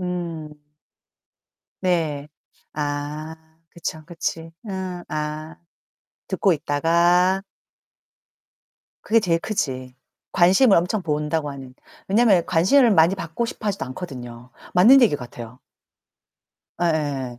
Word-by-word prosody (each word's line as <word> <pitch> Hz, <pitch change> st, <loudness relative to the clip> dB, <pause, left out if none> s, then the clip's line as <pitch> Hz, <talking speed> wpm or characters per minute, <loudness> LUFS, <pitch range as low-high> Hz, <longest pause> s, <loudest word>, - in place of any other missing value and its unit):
음. 170 Hz, -4 st, -4 dB, 1.3 s
네. 160 Hz, -5 st, 0 dB, 0.5 s
아 150 Hz, +1 st, -4 dB, 0.3 s
그쵸, 160 Hz, -2 st, -6 dB
그치. 165 Hz, -1 st, -5 dB, 0.2 s
응. 185 Hz, -2 st, -5 dB
아 155 Hz, +1 st, -5 dB, 0.7 s
듣고 195 Hz, -, +2 dB
있다가 170 Hz, +5 st, +2 dB, 1.6 s
그게 230 Hz, +1 st, +3 dB
제일 170 Hz, -5 st, +1 dB
크지 130 Hz, -12 st, -3 dB, 0.4 s
관심을 195 Hz, +5 st, +5 dB
엄청 180 Hz, +4 st, 0 dB
본다고 150 Hz, -1 st, -1 dB
하는. 135 Hz, -2 st, -10 dB, 0.3 s
왜냐면 200 Hz, -4 st, +4 dB
관심을 210 Hz, +10 st, +4 dB
많이 175 Hz, -2 st, +5 dB
받고 180 Hz, +4 st, -4 dB
싶어 230 Hz, -, -6 dB
하지도 200 Hz, -7 st, -1 dB
않거든요. 125 Hz, -5 st, -8 dB, 0.3 s
맞는 245 Hz, +9 st, +7 dB
얘기 210 Hz, -10 st, +4 dB
같아요. 120 Hz, -2 st, -10 dB, 1.2 s
예예. 145 Hz, -7 st, -1 dB
165 Hz, 200 characters per minute, -22 LUFS, 145-185 Hz, 1.6 s, 맞는